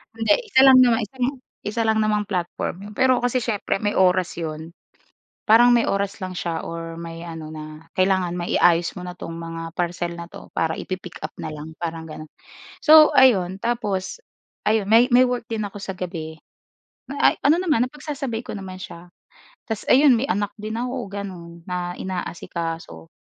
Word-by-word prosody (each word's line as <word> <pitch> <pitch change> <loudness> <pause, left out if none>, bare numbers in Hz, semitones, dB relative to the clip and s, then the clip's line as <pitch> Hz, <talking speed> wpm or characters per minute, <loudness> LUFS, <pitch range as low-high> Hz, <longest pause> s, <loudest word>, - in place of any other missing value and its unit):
Hindi, 225 -2 +3 0.2
isa 260 - +5
lang 265 -1 +9
naman 240 -2 +4
isang 250 +4 -3 0.4
isa 215 +3 -2
lang 220 0 +2
namang 210 -1 +1
platform 180 -5 -3
'yon. - - -11
Pero 260 -1 +4
kasi 245 +1 +1
siyempre 210 -4 -1
may 205 0 +1
oras 185 -1 +3
'yon, 160 0 -5 0.8
parang 235 +3 +7
may 235 -1 +3
oras 200 0 -1
lang 185 -1 -5
siya 165 -2 -2
or 165 0 -6
may 165 0 -7
ano 160 -2 -7
na 155 +1 -9
kailangan 185 -2 +2
maiayos 175 0 +2
mo 180 - -7
na 180 - -6
'tong 165 - -8
mga 165 0 -6 0.2
parcel 175 0 -1
na 170 - -6
'to - - -12
para 160 0 0
ipi-pick-up 185 -2 -6
na - - -4
lang, 150 +1 -8
parang 165 -1 -4
gano'n. 155 -1 -9 0.5
So 310 0 +8
ayun, 190 -7 +4
tapos 230 - -2 0.4
ayun 210 -1 +2
may 235 +4 +5
may 250 +1 +6
work 245 -1 -2
din 215 -2 -2
ako 200 - -10
sa 195 - -4
gabi, 160 -3 -5 0.8
ay - - +5
ano 295 +3 +5
naman 300 -10 +2
napagsasabay 275 -5 -5
ko - - -5
naman 190 -2 -8
siya. 175 -1 -10 0.6
Tapos 220 -2 -3
ayun 270 0 +7
may 260 +5 -1
anak 205 +2 -1
din 215 +1 -5
ako, 250 +1 -3 0.2
gano'n, 185 -4 -7 0.2
na 180 -1 -3
inaasikaso. 165 - -5
190 Hz, 175 wpm, -23 LUFS, 170-230 Hz, 0.8 s, lang